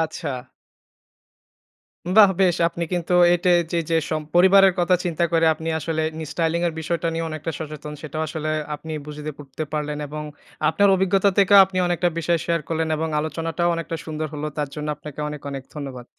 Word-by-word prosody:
আচ্ছা। 160 -4 -4 1.8
বাহ! 205 -3 +9
বেশ 180 -3 +4
আপনি 170 0 -4
কিন্তু 175 0 -1 0.2
এটায় 175 0 +3
চে 170 - 0
যে 165 - +2
সম 155 -1 -1
পরিবারের 190 +1 +6
কথা 180 +1 +4
চিন্তা 170 -1 0
করে 165 -1 +3
আপনি 160 +1 -7
আসলে 160 0 -2
নিজ 160 - -5
স্টাইলিং 165 0 0
এর 165 - -3
বিষয়টা 165 +1 -2
নিয়েও 165 0 -2
অনেকটা 155 +1 -4
সচেতন। 150 -1 -7
সেটাও 155 0 -4
আসলে 155 0 -4 0.3
আপনি 160 +1 -9
বুঝেতে 150 0 -6
করতে 145 +1 -6
পারলেন। 150 -1 -2
এবং 150 +1 -6 0.5
আপনার 200 0 +3
অভিজ্ঞতা 190 +1 +3
থেকেও 200 0 +6
আপনি 190 -1 -6
অনেকটা 175 0 +1
বিষয় 170 0 +1
শেয়ার 170 -1 0
করলেন 160 -1 -1
এবং 160 +1 -1
আলোচনাটাও 165 +2 -1
অনেকটা 165 0 -4
সুন্দর 155 0 -3
হল। 150 0 -5
তার 145 -2 -1
জন্য 150 0 -4
আপনাকে 150 0 -10
অনেক 150 -1 -7
অনেক 135 -2 -6
ধন্যবাদ। 135 -4 -7
160 Hz, 180 wpm, -23 LUFS, 150-175 Hz, 1.8 s, বাহ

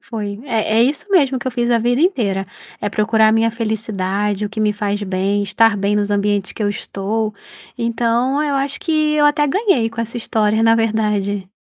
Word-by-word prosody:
Foi, 205 -3 -6
é 225 -4 0
é - - +7
isso 275 +5 0
mesmo 275 -8 +3
que 255 - -9
eu - - +1
fiz 240 -1 -1
a 235 - +3
vida 245 +3 +1
inteira, 220 - +1 0.4
é 205 - -1
procurar 220 +1 +2
minha 225 +1 +2
felicidade 210 -3 -2
o - - -7
que 220 +1 -5
me 210 -1 +2
faz 205 0 -2
bem, 195 +1 -1
estar 205 +2 +2
bem 200 +1 0
nos 205 0 0
ambientes 205 -1 0
que 215 - -5
eu 205 - +1
estou, 210 +2 -3 0.4
então 240 +4 0
eu 290 -2 -1
acho 275 +1 -1
que 325 - -2 0.2
eu 295 -1 +3
até 295 0 +2
ganhei 290 - +1
com 230 0 -5
essa 230 +1 -5
história, 220 -1 0
na 225 0 +5
verdade. 210 -3 -1
220 Hz, 200 wpm, -18 LUFS, 205-240 Hz, 0.4 s, é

